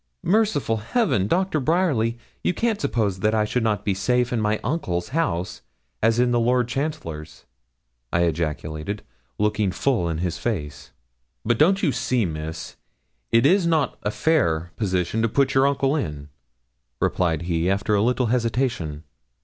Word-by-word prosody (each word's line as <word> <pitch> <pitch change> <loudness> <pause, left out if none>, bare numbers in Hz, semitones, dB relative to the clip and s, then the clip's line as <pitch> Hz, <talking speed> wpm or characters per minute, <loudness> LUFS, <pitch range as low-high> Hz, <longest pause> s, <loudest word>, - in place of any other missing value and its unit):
'Merciful 190 - +2
Heaven! 110 - +1
Doctor 185 - +1
Bryerly, 140 -7 +1 0.3
you 180 - +1
can't 225 -3 0
suppose 110 -9 0
that 110 +3 +1
I 105 -1 +2
should 125 +3 -1
not 105 -2 0
be 100 - +2
as 95 - -3
safe 125 +3 +1
in 115 - 0
my 105 0 +1
uncle's 90 - -2
house 130 - -1 0.4
as 115 +1 +3
in 120 0 +3
the 120 - +2
Lord 125 +1 +2
Chancellor's?' 120 - -5 0.7
I 85 - +2
ejaculated, 80 +3 -2 0.3
looking 105 -2 +1
full 115 -7 0
in 80 - -2
his 90 0 -2
face. 75 - -4 0.5
'But 115 0 +1
don't 190 +6 +4
you - - +3
see, 125 -3 0
Miss, 80 -1 -6 0.5
it 115 +3 +4
is 180 +3 +4
not 160 -4 +1
a 105 - -1
fair 90 - +1
position 95 +1 -1
to 115 - +2
put 135 +3 +2
your 130 +1 +4
uncle 140 0 +1
in,' 75 - -4 0.7
replied 85 -3 0
he, 85 0 0
after 100 +2 0
a 100 - +3
little 125 +3 +2
hesitation. 115 - -1
110 Hz, 160 wpm, -23 LUFS, 90-135 Hz, 0.7 s, don't